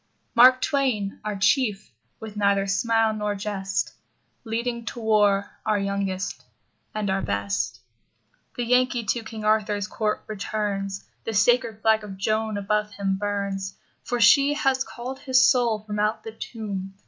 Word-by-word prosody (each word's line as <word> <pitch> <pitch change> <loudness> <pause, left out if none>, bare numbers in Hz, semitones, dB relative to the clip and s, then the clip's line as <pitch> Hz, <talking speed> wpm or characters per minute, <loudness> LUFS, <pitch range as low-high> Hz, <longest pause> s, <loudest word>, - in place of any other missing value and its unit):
Mark 255 +1 +7
Twain, 250 -9 0
our 210 -1 -3
Chief, 210 0 +1 0.3
with 220 -1 -8
neither 200 -1 +2
smile 225 +2 +2
nor 210 -1 -2
jest, 195 -1 -2 0.5
Leading 235 +1 -2
to 240 - -5
war 205 -3 +2
our 215 - +1
youngest 195 -1 -2 0.5
and 215 -1 -1
our 195 0 0
best. 100 +4 -2 0.8
The 245 - -2
Yankee 250 0 +2
to 225 +3 -1
King 220 -1 -7
Arthur's 210 -2 +1
court 210 0 -2
returns. 200 -2 -3 0.2
The 225 - -4
sacred 230 0 +2
flag 220 -1 +4
of 195 -2 -8
Joan 215 +2 0
above 210 +1 0
him 195 -1 -1
burns. 200 -2 -3 0.3
For 245 - -2
she 280 +6 +6
has 270 -3 +1
called 255 +2 -7
his 255 -2 +4
soul 235 -5 +2
from 210 -1 -4
out 215 +1 0
the 225 - -6
tomb. 200 -4 -6
215 Hz, 150 wpm, -25 LUFS, 200-235 Hz, 0.8 s, Mark